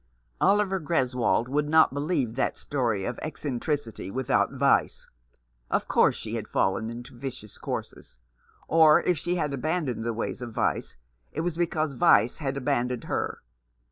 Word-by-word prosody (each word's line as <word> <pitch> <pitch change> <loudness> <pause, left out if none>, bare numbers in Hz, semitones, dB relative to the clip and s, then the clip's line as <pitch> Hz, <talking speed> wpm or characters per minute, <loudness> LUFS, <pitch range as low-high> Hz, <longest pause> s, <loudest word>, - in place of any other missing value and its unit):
Oliver 200 -2 +3
Greswold 125 -7 +1
would 145 +3 0
not 160 -3 +5
believe 140 -5 -1
that 130 - -1
story 115 -8 -1
of 120 - -4
eccentricity 145 - -3
without 130 +4 +1
vice. - - +1 0.6
Of - - 0
course - - +4
she 110 - -6
had 115 -2 -3
fallen 95 +4 0
into 120 +1 -8
vicious 125 -5 -8
courses; - - -6 0.5
or 160 -1 +6
if 175 -4 +1
she 175 +3 -1
had 150 -5 -1
abandoned 145 -4 -1
the 115 - -1
ways 115 +2 -4
of 120 -2 -6
vice, - - -1 0.3
it 155 - -3
was 175 -1 -2
because 160 -3 0
vice 120 -1 +4
had 135 -3 -2
abandoned 125 -3 -1
her. - - -3
135 Hz, 150 wpm, -27 LUFS, 120-155 Hz, 0.6 s, or